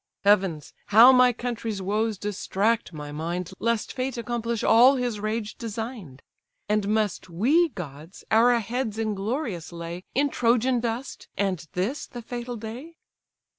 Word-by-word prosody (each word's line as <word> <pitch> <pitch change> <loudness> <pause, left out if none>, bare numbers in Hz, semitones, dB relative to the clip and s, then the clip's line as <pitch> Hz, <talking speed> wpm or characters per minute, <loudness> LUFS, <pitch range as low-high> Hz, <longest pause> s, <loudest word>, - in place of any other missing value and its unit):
Heavens! 190 -7 +2
how 230 +5 +9
my 250 -1 +6
country's 230 -3 -4
woes 210 +3 -1
distract 210 +3 -1
my 150 -2 -7
mind, 170 +4 -4
Lest 230 -1 -1
Fate 255 -1 -3
accomplish 235 -1 -2
all 245 +5 +6
his 245 -4 -2
rage 215 0 -3
design'd! 220 - -6 0.4
And 210 -1 +1
must 210 -4 0
we, 275 - +3
gods! 160 - -9
our 235 +2 +5
heads 225 0 -3
inglorious 215 - -3
lay 170 +1 -7
In 285 +1 +2
Trojan 245 +1 +2
dust, 235 +3 -4
and 185 -5 -1
this 205 +11 -2
the 240 -1 -9
fatal 240 +1 -5
day? 245 +10 -8
220 Hz, 135 wpm, -25 LUFS, 195-245 Hz, 0.4 s, how